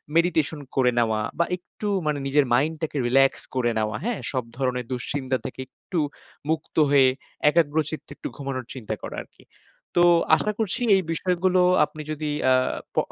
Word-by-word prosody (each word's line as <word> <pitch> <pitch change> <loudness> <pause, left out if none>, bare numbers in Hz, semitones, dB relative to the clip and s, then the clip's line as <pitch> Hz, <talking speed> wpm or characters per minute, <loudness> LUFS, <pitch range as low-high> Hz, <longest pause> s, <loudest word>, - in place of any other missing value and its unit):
Meditation 165 -3 +2 0.2
করে 125 -2 +4
নেওয়া 110 -2 +1 0.2
বা 170 - +4
একটু 195 +4 -8 0.2
মানে 150 -1 0
নিজের 140 +1 +3
মাইন্ড 150 +6 +2
টাকে 150 -2 -2
রিল্যাক্স 135 +2 +3
করে 120 -2 +2
নেওয়া, 110 0 -1
হ্যাঁ? 235 0 -1
সব 130 -2 -1
ধরণের 125 -2 -1
দুশ্চিন্তা 130 +1 -2
থেকে - - -4
একটু 170 +6 -5 0.5
মুক্ত 160 -1 -2
হয়ে, 140 -2 +6 0.4
একাগ্রচিত্তে 155 -1 0
একটু - - -6
ঘুমানোর 135 -2 -4
চিন্তা 125 -5 -5
করা - - -6
আরকি। - - -23 0.5
তো 175 - +6 0.3
আশা 210 - 0
করছি 220 +2 -1
এই 190 - +2
বিষয়গুলো 180 +2 +1 0.2
আপনি 155 - -10
যদি 155 0 -3 0.2
আ - - +7 0.4
প - - -19
145 Hz, 160 wpm, -24 LUFS, 130-165 Hz, 0.5 s, আ